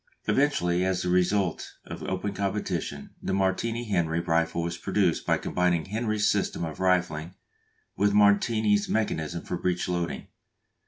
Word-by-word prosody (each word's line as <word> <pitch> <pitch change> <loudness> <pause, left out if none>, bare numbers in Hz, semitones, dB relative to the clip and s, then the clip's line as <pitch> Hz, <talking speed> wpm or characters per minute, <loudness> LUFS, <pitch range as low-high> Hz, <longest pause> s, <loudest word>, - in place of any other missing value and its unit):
Eventually 90 -12 +2
as 95 -1 0
the 90 - -1
result 90 0 +1
of - - -8
open 95 +2 -3
competition 95 -7 -3
the 95 - -1
Martini 115 +5 0
Henry 85 -5 +1
rifle 85 0 0
was 85 0 -2
produced 90 -1 0
by - - +3
combining 90 -3 0
Henry's 110 0 0
system - - 0
of 80 - -7
rifling 90 -2 0 0.6
with 100 0 +2
Martini's 105 +1 +3
mechanism 85 -6 -1
for 90 - -3
breech 90 0 -1
loading. 85 -1 -2
90 Hz, 140 wpm, -27 LUFS, 85-105 Hz, 0.6 s, by